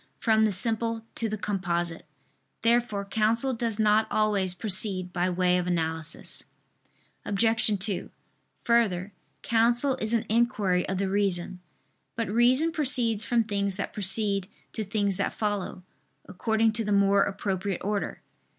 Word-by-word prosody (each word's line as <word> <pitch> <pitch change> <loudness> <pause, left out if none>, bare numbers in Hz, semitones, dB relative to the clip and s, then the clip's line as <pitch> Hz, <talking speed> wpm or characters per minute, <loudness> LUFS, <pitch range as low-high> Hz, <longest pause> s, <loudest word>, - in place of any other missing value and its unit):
from 220 -1 +2
the 215 - +1
simple 225 +3 +1
to 225 - -2
the 215 - -3
composite. 175 -5 -3 0.6
Therefore 230 -3 +1
counsel 225 +5 0
does 230 -2 -2
not 215 0 +3
always 200 -4 +1
proceed 185 -2 +2
by 180 0 0
way 180 0 +1
of 180 - -3
analysis. 160 -2 -3 0.8
Obj. 225 +2 +2
2: 195 -1 -2 0.5
Further, 205 -5 +1 0.3
counsel 235 +4 +2
is 220 +2 +1
an 230 - -1
inquiry 215 -6 0
of 190 - -2
the 195 +1 -1
reason. 190 -2 -1 0.6
But 230 -4 -3
reason 255 +8 +3
proceeds 245 -8 +3
from 235 -1 +1
things 200 -2 -2
that 200 - -5
precede 200 -1 +2 0.3
to 220 - -3
things 200 -1 -1
that 200 - -2
follow, 205 -4 -3 0.4
according 220 +3 0
to 225 +1 0
the 210 - -3
more 200 0 +3
appropriate 195 -1 -2
order. 205 0 -3
205 Hz, 140 wpm, -26 LUFS, 190-225 Hz, 0.8 s, not